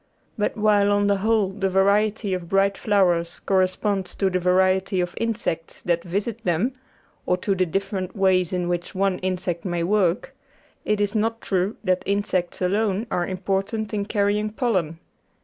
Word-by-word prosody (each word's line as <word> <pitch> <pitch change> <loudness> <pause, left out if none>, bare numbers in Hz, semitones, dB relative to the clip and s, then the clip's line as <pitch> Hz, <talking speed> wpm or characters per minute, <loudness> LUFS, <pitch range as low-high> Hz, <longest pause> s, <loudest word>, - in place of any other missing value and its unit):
But 210 0 -1
while 205 -1 +3
on 205 0 +2
the 200 0 +2
whole 215 -1 +2
the 195 0 -2
variety 200 +2 +2
of 175 -2 -4
bright 195 0 +3
flowers 180 -6 +1
corre 190 -1 +2
sponds 195 0 -3
to 195 -1 +1
the 185 - +1
variety 185 +1 +2
of 175 0 -1
insects 215 -8 -3
that 170 -1 0
visit 205 +6 -3
them, 185 +9 0 0.5
or 180 - +2
to 195 +2 0
the 185 -1 +1
different 195 +1 -3
ways 185 -3 +2
in 180 -1 -1
which 175 +2 -3
one 195 -1 +1
insect 185 -2 -2
may 175 -2 -1
work, 190 +1 +1 0.5
it 210 -1 +1
is 205 0 0
not 225 +1 0
true 190 +1 -1
that 185 -2 +1
insects 190 -3 -1
alone 205 +2 +1
are 175 -1 0
important 195 +4 -2
in 205 -1 -1
carrying 210 0 +1
pollen. 190 - -1
195 Hz, 165 wpm, -23 LUFS, 180-205 Hz, 0.5 s, while